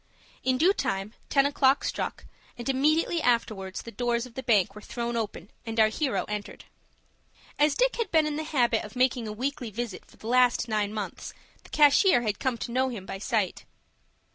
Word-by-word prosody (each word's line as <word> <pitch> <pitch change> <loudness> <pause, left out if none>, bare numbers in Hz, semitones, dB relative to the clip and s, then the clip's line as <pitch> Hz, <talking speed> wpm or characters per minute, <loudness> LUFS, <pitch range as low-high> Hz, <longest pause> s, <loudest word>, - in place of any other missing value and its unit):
In 260 0 +2
due 350 +8 +4
time 195 - -2 0.2
ten 275 -1 +4
o'clock 280 -1 +3
struck, - - -3 0.3
and 240 - -6
immediately 310 +5 +2
afterwards 215 -7 0
the 230 - -9
doors 240 +1 -1
of 250 - -13
the 265 - -5
bank 210 -6 +2
were 210 - -10
thrown 235 +1 -4
open, 215 -3 -4
and 225 -1 -4
our 215 0 +6
hero 265 +4 -1
entered. 210 -1 -6 0.9
As 295 -1 +4
Dick - - +2
had 465 - -1
been 315 -2 +3
in 300 -1 -2
the 310 - -3
habit 245 -7 +1
of 210 +3 -10
making 250 -2 +1
a - - -4
weekly 250 +2 -3
visit 215 -2 -5
for - - -21
the - - -15
last 245 0 +3
nine 210 -2 0
months, 210 -1 -6 0.3
the - - -16
cashier 295 - +5
had 210 -3 -2
come 255 -3 -1
to 235 - -5
know 260 +2 +1
him 215 -7 -7
by 195 - -6
sight. 210 -4 -1
240 Hz, 195 wpm, -27 LUFS, 215-275 Hz, 0.9 s, our